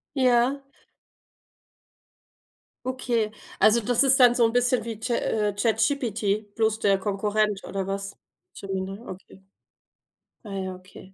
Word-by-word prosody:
Ja. 255 +1 +3 2.2
Okay. 240 -4 -1 0.3
Also 220 +3 +5
das 245 +4 +2
ist 270 0 +4
dann 245 -1 +7
so 235 - +4
'n 225 - 0
bisschen 245 0 +2
wie 225 -2 -6
Cha 235 +2 -2
äh, 210 -2 0
ChatGPT, 220 -2 0
bloß 220 -1 +1
der 200 -1 +3
Konkurrent 205 +1 -1
oder 195 -1 -3
was? 195 0 -5 0.4
Gemini, 195 0 -4
okay. 190 +1 -11 1.0
Ah 205 -2 -8
ja, 190 -1 -4
okay. 185 +1 -15
215 Hz, 125 wpm, -25 LUFS, 195-240 Hz, 2.2 s, dann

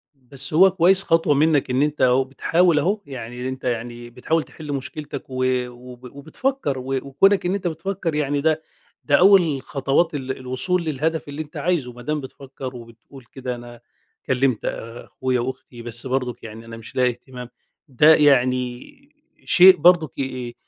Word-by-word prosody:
بس 135 +1 -8
هو 190 +4 +6
كويس 190 +1 +4
خطوة 165 -2 +2
منّك 145 -1 +2
إن 130 +2 +1
أنت 150 0 -1
أهو 130 +1 +4
بتحاول 165 +4 +2
أهو، 200 +7 0
يعني 125 -1 -6
أنت 130 0 -7
يعني 120 0 -4
بتحاول 155 +7 -1
تحِل 150 -2 -8
مشكلتك 140 +1 -6
و 130 0 -2 0.2
وب 125 0 -13
وبتفكّر 160 - -3
و - - -7
وكُونك 185 +10 +2
إن 180 - 0
أنت 190 -3 -3
بتفكّر 170 0 -3
يعني 145 -1 0
ده 160 0 +1 0.4
ده 145 - +3
أول 175 -8 +5
خطوات 140 +5 0
ال 130 -2 -4
الوصول 130 +8 -1
للهدف 160 +1 -2
اللي 145 +2 -5
أنت 150 - -10
عايزه، 155 -9 -1
ما 120 - -12
دام 150 +4 -2
بتفكّر 130 -1 -9
وبتقول 115 +2 -14
كده 125 -2 -5
أنا 120 -1 -12 0.4
كلِّمت 130 -2 0
أخويا 125 +2 -4
وأختي، 125 -1 -6
بس 120 +2 -5
برضُك 125 -2 -3
يعني 110 +1 -10
أنا 115 0 -9
مش 115 - -11
لاقي 125 -1 +3
اهتمام، 125 0 -9 0.4
ده 150 +4 +5
يعني 125 -4 +1 0.5
شيء 185 0 +7
برضُك 170 -7 +3
ي 130 -2 -4
آآ - - -12
135 Hz, 165 wpm, -22 LUFS, 125-160 Hz, 0.5 s, شيء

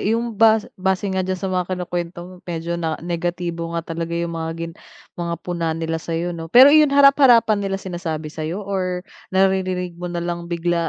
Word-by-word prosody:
yung 230 +2 0
bas 220 -1 +5 0.2
base 190 +1 0
nga 190 - 0
diyan 185 0 -1
sa 180 - -8
mga 185 0 -1
kinukwento 175 -1 -4
mo 185 +1 -11
medyo 170 0 -3
na 160 -2 -1
negatibo 170 -1 -3
nga 165 - -3
talaga 165 0 -4
yung 170 0 -2
mga 165 -1 -3
gin 165 0 -5 0.4
mga 170 -1 -3
puna 170 -2 -2
nila 165 0 -2
sa'yo 170 +2 -3
'no. 165 -1 -7
Pero 260 - +8
ayun 305 -1 +6
harap-harapan 275 -6 +5
nila 195 -1 -2
sinasabi 170 -5 -5
sa'yo 160 +6 -4
or 185 -2 -2 0.2
naririnig 185 -1 +1
mo 180 - -4
nalang 170 0 -4
bigla 170 -1 0
175 Hz, 180 wpm, -21 LUFS, 170-190 Hz, 0.4 s, Pero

